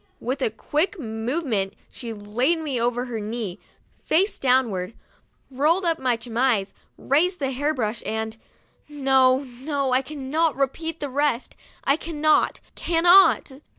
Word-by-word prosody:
With 260 +4 -3
a 255 - +2
quick 305 - -1
move 240 +6 -3
ment 200 -6 -1 0.2
she 235 -3 -7
laid 225 +9 0
me 285 -7 -2
over 245 +1 0
her 235 -3 -4
knee, 210 -3 -4 0.4
face 380 +6 +1
downward, 235 -7 +1 0.6
rolled 310 +8 +2
up 330 -1 +1
my 250 -3 +1
chemise, 230 -4 0 0.2
raised 355 +7 +1
the 270 -4 -2
hair 285 +4 0
brush, 230 -6 -2
and 220 0 -3 0.5
no, 265 -2 +3
no, 270 +2 -3
I 255 - +4
cannot 300 +3 -1
repeat 320 +4 -2
the 285 - -3
rest, 280 -2 0 0.3
I 275 - +3
cannot, 310 -2 +1
cannot. 345 -1 +4
265 Hz, 140 wpm, -24 LUFS, 230-305 Hz, 0.6 s, I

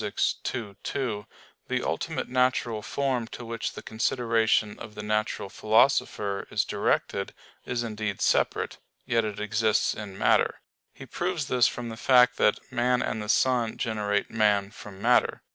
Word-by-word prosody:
ii, 105 0 -2
2), 115 -7 -3 0.4
the - - -1
ultimate - - -2
natural 125 -3 +1
form 130 -2 -1
to 120 - -8
which 115 0 -4
the - - -9
consideration 115 -2 +1
of 105 -2 -9
the 105 - -6
natural 105 -1 -1
philosopher 105 -2 +1
is - - 0
directed 100 - -1 0.3
is 120 -1 -2
indeed 105 -3 -3
separate; - - +1 0.3
yet 115 -2 +2
it 105 -1 -4
exists 105 +1 +1
in 100 -3 -8
matter. - - +2 0.3
He - - -11
proves 175 -4 -2
this 125 -2 +4
from 120 -1 -4
the 110 - -7
fact 125 0 +5
that 105 - +3
"man 125 0 +1
and 110 - -2
the 105 - -6
sun 120 -2 +2
generate 105 -2 -1
man 105 -3 +2
from 105 -2 -11
matter." - - +3
110 Hz, 150 wpm, -27 LUFS, 105-125 Hz, 0.4 s, fact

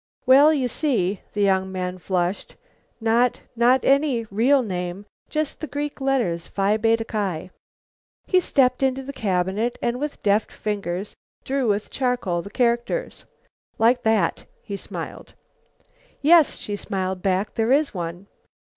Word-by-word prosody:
"Well, 280 +4 +7
you 275 -5 +1
see," 220 - 0
the 205 - 0
young 190 -1 +2
man 185 -1 -4
flushed, 180 +1 -2 0.4
"not 230 +2 +2
not 245 +3 +3
any 275 -4 +2
real 255 +6 +3
name; 180 -1 -4 0.2
just 305 -1 -2
the 310 - -5
Greek 290 +1 -4
letters, 240 -12 0
Phi 200 +1 +1
Beta 225 +1 +1
Ki." 190 -6 -3 0.7
He 370 - +3
stepped 260 -7 +2
into 265 0 +1
the 280 +1 -7
cabinet 195 +2 -1
and, 240 +1 -1
with 295 +1 -5
deft 205 +1 +2
fingers, 200 -2 -4 0.3
drew 270 -2 -1
with 205 0 -1
charcoal 245 -10 -1
the 200 - -9
characters. 240 - -1 0.5
"Like 240 +3 +3
that," 220 -2 +1 0.2
he 200 - -5
smiled. - - -8 0.8
"Yes," 320 +1 +5
she 205 - -5
smiled 190 -2 -3
back, 195 +1 0
"there 225 +2 0
is 290 +2 +3
one." 175 0 -5
225 Hz, 140 wpm, -23 LUFS, 190-265 Hz, 0.8 s, Well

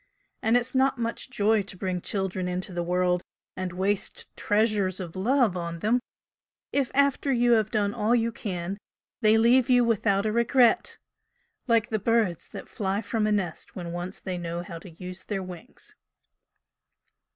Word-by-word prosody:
And 225 +2 +4
it's 245 +1 -2
not 265 0 +3
much 230 +2 -3
joy 215 -2 +2
to 195 -1 -9
bring 185 -1 -2
children 190 -2 -2
into 180 +1 -3
the 175 - -1
world 180 0 +1 0.3
and 185 -1 -3
waste 190 +3 -2
treasures 205 -3 +1
of 175 -2 -6
love 230 +1 +2
on 170 -1 -4
them, 220 +8 +2 0.7
if 275 -3 +1
after 280 0 +3
you 240 -1 +3
have 220 -2 +4
done 205 -2 0
all 230 +1 +2
you 230 -1 +1
can, 190 -2 -4 0.4
they 220 -1 +5
leave 240 +3 +4
you 245 -1 +5
without 205 -3 +2
a 215 - +1
regret, 235 +1 +3 0.7
like 230 -3 +3
the 215 - 0
birds 220 -6 +1
that - - -9
fly 200 -1 -2
from 215 0 0
a - - +1
nest 190 -6 -2
when 175 -2 -5
once 175 +2 -5
they 185 -2 -5
know 170 0 -4
how 170 -1 -8
to 185 - -12
use 180 +2 -9
their 195 -3 -3
wings." 180 -2 -10
205 Hz, 170 wpm, -27 LUFS, 180-230 Hz, 0.7 s, they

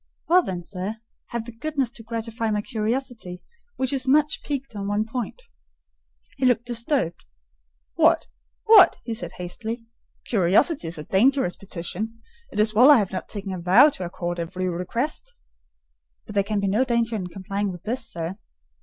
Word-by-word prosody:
"Well 360 +2 +6
then, 180 - -5
sir, 190 +4 -5 0.3
have 235 -1 -4
the 240 - -8
goodness 275 0 -2
to - - -12
gratify 230 0 -3
my 210 -1 0
curiosity, 220 -5 -3 0.3
which 260 +1 -1
is 270 -1 -1
much 295 +2 +3
piqued 275 -5 -4
on 200 -1 -4
one 205 +1 0
point." 240 - -4 1.0
He 265 - 0
looked 245 -1 +2
disturbed. 235 - -1 0.7
"What? - - +4 0.4
what?" - - +8
he 230 - -3
said 175 -5 -4
hastily. 220 +6 -5 0.4
"Curiosity 200 - +3
is 165 +1 -5
a 150 - -5
dangerous 225 - +2
petition: 195 +4 -4 0.4
it - - -4
is 215 0 +3
well 245 +6 +7
I 295 - +9
have 205 -4 0
not 190 - -5
taken 200 -2 -5
a 185 - -4
vow 205 - +7
to 190 - -6
accord 175 0 -4
every 185 +2 -3
request—" 235 - -3 0.9
"But 210 - -9
there 200 -1 +3
can 210 +1 -1
be 200 - 0
no 210 +6 +3
danger 235 -2 0
in 185 -4 -3
complying 195 +2 -3
with 175 -1 -10
this, 240 +4 -2
sir." 170 +4 -5
220 Hz, 170 wpm, -24 LUFS, 185-245 Hz, 1.0 s, I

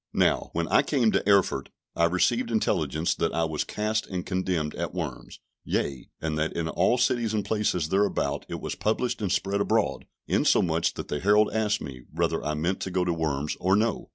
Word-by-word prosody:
Now, - - +2
when 85 0 -1
I - - +5
came 125 -7 +2
to - - +2
Erfurt, 95 -9 +3 0.3
I 85 - +3
received 90 - +1
intelligence 80 - 0
that - - -1
I 85 - +1
was 80 -2 -1
cast 110 +1 -2
and 90 -2 -4
condemned 90 -5 -1
at - - -4
Worms, - - -5 0.2
yea, 70 -3 -2
and 75 -1 -2
that 80 +1 -1
in 85 -1 -2
all 90 +9 +2
cities 120 -3 +1
and 105 -2 -1
places 100 -6 0
thereabout 95 -7 0
it - - -4
was - - -4
published 110 +2 -1
and 100 -4 -1
spread 100 +1 0
abroad; 110 +1 0 0.2
insomuch 85 -1 +2
that - - -6
the 75 - -2
herald 105 +4 +4
asked 105 -1 +1
me, 65 -3 -7
whether - - -1
I 75 0 -1
meant 85 +5 -1
to - - -3
go 90 0 0
to 85 - +1
Worms, 75 -3 -1
or 95 +2 +3
no? 110 +3 0
90 Hz, 200 wpm, -26 LUFS, 80-105 Hz, 0.3 s, I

